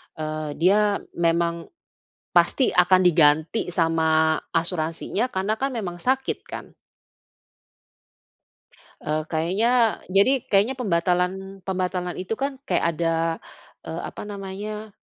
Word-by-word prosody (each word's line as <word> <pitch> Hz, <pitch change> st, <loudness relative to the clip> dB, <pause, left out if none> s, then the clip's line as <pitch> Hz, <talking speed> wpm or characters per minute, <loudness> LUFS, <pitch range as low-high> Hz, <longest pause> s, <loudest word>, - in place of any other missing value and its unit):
eee, 155 Hz, -1 st, -4 dB
dia 205 Hz, +4 st, +3 dB, 0.2 s
memang 170 Hz, 0 st, +1 dB, 0.7 s
pasti 265 Hz, -, +3 dB
akan 180 Hz, +1 st, +5 dB
diganti 160 Hz, +4 st, +3 dB
sama 160 Hz, -2 st, +2 dB
asuransinya 165 Hz, +7 st, -1 dB
karena 195 Hz, +1 st, -1 dB
kan 275 Hz, -, +1 dB
memang 190 Hz, -9 st, -5 dB
sakit 265 Hz, +4 st, 0 dB
kan. -, -, -8 dB, 2.3 s
Eee, 155 Hz, +1 st, -1 dB
kayaknya 220 Hz, +8 st, +1 dB
jadi 200 Hz, +7 st, +3 dB
kayaknya 205 Hz, +6 st, +3 dB
pembatalan 190 Hz, -2 st, -1 dB
pembatalan 180 Hz, -1 st, -2 dB
itu 185 Hz, +4 st, -3 dB
kan 275 Hz, +3 st, -3 dB
kayak -, -, 0 dB
ada, 165 Hz, -1 st, +1 dB, 0.7 s
eee, 165 Hz, +2 st, -5 dB
apa -, -, -9 dB
namanya, 205 Hz, +2 st, -6 dB
185 Hz, 105 wpm, -24 LUFS, 165-210 Hz, 2.3 s, akan